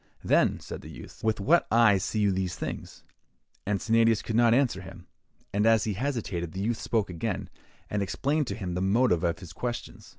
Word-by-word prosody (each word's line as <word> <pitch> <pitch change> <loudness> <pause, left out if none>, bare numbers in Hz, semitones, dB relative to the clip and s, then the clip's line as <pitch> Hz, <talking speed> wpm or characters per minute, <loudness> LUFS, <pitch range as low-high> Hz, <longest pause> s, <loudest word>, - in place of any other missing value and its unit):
'Then,' - - +3
said - - -8
the - - -11
youth, - - -12
'with 110 -1 +1
what 165 +12 +3
eyes 110 -4 +4
see 110 - -2
you 100 -1 +3
these 95 -2 -2
things?' - - -6 0.6
And 100 -1 +1
Sennadius 115 +1 +3
could 110 - -3
not 120 0 +5
answer 120 -6 +2
him; 95 -1 -11 0.5
and 105 +2 +2
as 115 -2 +5
he 110 - -1
hesitated, 100 - -3
the 95 - -5
youth 115 +1 -1
spoke 105 -5 0
again, 85 -2 -4 0.4
and 105 - -2
explained 140 - 0
to 100 - -3
him 95 -5 -4
the 90 - -2
motive 95 -2 +2
of 85 -1 +1
his 85 -1 -11
questions. 120 +3 -5
105 Hz, 200 wpm, -28 LUFS, 95-115 Hz, 0.6 s, not